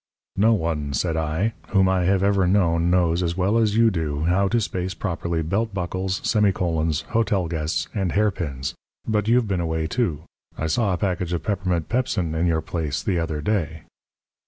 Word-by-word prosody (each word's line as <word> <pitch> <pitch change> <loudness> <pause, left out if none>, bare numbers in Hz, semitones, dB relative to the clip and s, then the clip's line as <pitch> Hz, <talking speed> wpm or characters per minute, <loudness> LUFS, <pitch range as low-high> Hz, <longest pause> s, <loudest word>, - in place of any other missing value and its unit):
"No 110 +3 +4
one," 80 -6 -2
said 80 +5 0
I, 80 +8 0
"whom 95 -2 +3
I 95 -1 +2
have 95 +1 +2
ever 100 -2 +3
known 85 -3 +2
knows 90 -1 +2
as 85 0 -1
well 100 +5 +2
as 110 -1 +2
you 115 -1 +5
do 80 -4 -2
how 95 +4 +2
to 120 +4 +2
space 95 -3 -3
properly 85 -3 -2
belt 100 +6 -1
buckles, 95 +1 -2
semi 105 -3 +3
colons, 80 -4 0
hotel 105 -6 +1
guests, 80 -1 -2
and 95 -5 -1
hairpins. 85 -10 -1 0.3
But 105 -2 0
you've 120 0 +3
been 95 -3 0
away, 80 -1 -1
too. 80 -6 -1 0.3
I 80 - -2
saw 100 +6 +1
a - - -1
package 90 -2 -1
of 85 -3 -2
peppermint 90 -5 -1
pepsin 115 -9 -1
in 80 +2 +1
your 80 -1 +1
place 80 -3 -3
the 90 -3 0
other 80 -2 -2
day." 80 -5 -1
90 Hz, 185 wpm, -23 LUFS, 80-100 Hz, 0.3 s, you